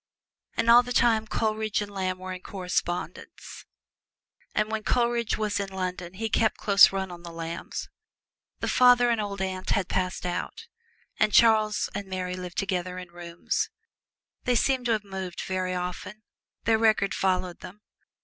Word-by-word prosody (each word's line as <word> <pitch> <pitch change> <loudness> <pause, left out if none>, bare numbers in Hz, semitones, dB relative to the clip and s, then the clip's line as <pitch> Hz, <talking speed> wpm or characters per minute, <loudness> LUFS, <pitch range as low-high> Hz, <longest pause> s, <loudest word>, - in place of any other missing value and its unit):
And 230 - +1
all 235 +1 +9
the 245 0 -5
time 225 -3 +3
Coleridge 215 -1 -1
and 205 -1 -4
Lamb 185 -2 -2
were 185 0 -6
in 185 - -8
correspondence: 180 -2 -4 0.9
and 215 0 +1
when 220 0 -1
Coleridge 235 0 +1
was 210 -2 -1
in 200 -1 -3
London 185 -1 -4
he 220 +3 -2
kept 220 0 +1
close 200 -1 +6
run 190 -1 -3
of 175 -1 -10
the 170 - -7
Lambs. 165 0 -5 0.7
The - - -1
father 245 -1 +5
and 230 -2 +1
old 200 -2 -3
aunt 185 0 -4
had 195 -3 +1
passed 185 -1 -1
out, 180 - -4 0.5
and 215 - +3
Charles 215 -2 +4
and 200 - -5
Mary 185 -1 -3
lived 180 -1 -7
together 185 -2 -2
in 180 -1 -8
rooms. 170 0 -3 0.8
They 250 - +2
seemed 255 +1 +1
to 230 - +3
have 215 -2 -1
moved 190 -3 -6
very 185 -1 -2
often 180 +4 -5 0.4
their 225 0 +3
record 215 -3 +3
followed 185 -2 0
them. 205 +4 -11
195 Hz, 165 wpm, -27 LUFS, 185-220 Hz, 0.9 s, all